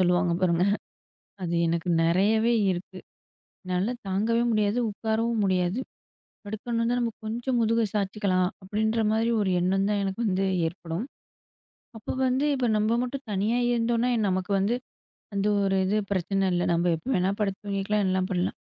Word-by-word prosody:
சொல்லுவாங்க 180 -1 +3
பாருங்க 180 -1 +2 0.8
அது 170 -1 -2
எனக்கு 170 +1 -1
நிறையவே 210 +7 +3 0.2
இருக்கு. 185 +1 -5 0.7
என்னால 185 +5 0
தாங்கவே 220 +5 +1
முடியாது. 215 0 +1
உட்காரவும் 220 +1 -1
முடியாது. 185 +2 +1 0.7
படுக்கணுன்னா, 230 +3 -1
நம்ம 235 -1 0
கொஞ்சம் 240 +3 -1
முதுக 230 +1 +2
சாய்ச்சுக்கலாம். 195 -3 +1
அப்பிடீன்ற 220 +4 0
மாரி 225 +1 +1
ஒரு 200 - +1
எண்ணம் 195 +2 +1
தான் 205 -1 +1
எனக்கு 195 +3 -3
வந்து 190 0 +1 0.2
ஏற்படும். 170 +4 -5 0.9
அப்போ 215 - -5 0.2
வந்து 260 +3 +1
இப்ப 255 -2 0
நம்ம 215 +2 +2
மட்டும் 270 +2 -5
தனியா 210 +4 +1 0.2
இருந்தோன்னா, 235 +1 +1 0.2
நமக்கு 185 +1 -2
வந்து 205 +5 +1 0.6
அந்த 200 +1 0 0.2
ஒரு 195 -1 +1
இது 205 +3 +1
பிரச்சன 195 +1 0
இல்ல. 175 0 +1
நம்ம 170 +1 +2
எப்ப 200 - -14
வேணா 185 +1 +2
படுத்து 195 -2 -1
தூங்கிக்கலாம். 200 +1 0
எல்லாம் 185 0 +1
பண்லாம். 180 0 -1
200 Hz, 145 wpm, -26 LUFS, 185-225 Hz, 0.9 s, சொல்லுவாங்க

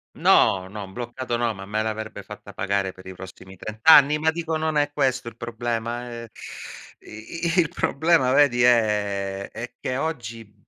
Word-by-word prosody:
No, 95 -1 +4
no, 100 -1 -8
bloccato 120 +1 -4
no, 120 -2 0
ma 95 0 -9
me 110 +2 -1
l'avrebbe 110 0 -4
fatta - - -11
pagare 100 -1 -1
per 95 0 -15
i 95 - -7
prossimi 95 +1 -11
30 110 +4 -8
anni, 150 -1 +7
ma 160 +1 +2
dico 160 -1 -2
non 155 -1 -1
è 145 0 +2
questo 130 -5 0
il - - -20
problema, 120 +1 -4
eh. 115 -1 -8 0.7
I 165 +10 -5
il 165 -3 +3
problema, 160 -5 +2
vedi, 130 -5 +4
è 100 -4 +1
è 120 +2 -8
che 130 - -3
oggi, 115 -8 -5
115 Hz, 170 wpm, -24 LUFS, 105-140 Hz, 0.7 s, anni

